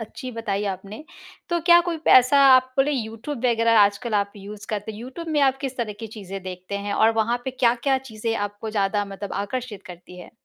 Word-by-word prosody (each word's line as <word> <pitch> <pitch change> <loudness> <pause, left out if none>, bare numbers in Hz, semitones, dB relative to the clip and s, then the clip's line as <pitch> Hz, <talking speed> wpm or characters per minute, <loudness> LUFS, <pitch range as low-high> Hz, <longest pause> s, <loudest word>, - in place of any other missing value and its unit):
अच्छी 225 +3 -7
बताई 210 -3 -3
आपने। 200 +9 -11 0.4
तो 345 -1 0
क्या 345 +1 +6
कोई 340 - -1
पैसा 255 +2 +6 0.2
आप 255 0 +2
बोले 275 +2 +2
यूट्यूब 235 +2 -5
वगैरह 230 -1 +3
आजकल 205 +3 +1
आप 200 0 0
यूज़ 205 +1 -10
करते 215 0 -4
हैं 210 - -10
यूट्यूब 265 +8 -8
में 300 -2 +1
आप 270 -1 +3
किस 270 -2 -4
तरह 230 -4 -3
की 225 - -5
चीज़ें 195 -3 -8
देखते 185 +1 -7
हैं। 205 0 -4
और 225 +1 +4
वहाँ 225 +2 +1
पे 265 - -2
क्या-क्या 255 +2 +1
चीज़ें 225 -3 -4
आपको 205 +2 -4
ज़्यादा 205 -1 0
मतलब 200 0 -7
आकर्षित 225 -2 -6
करती 180 0 -12
है? - - -12
225 Hz, 205 wpm, -23 LUFS, 205-255 Hz, 0.4 s, क्या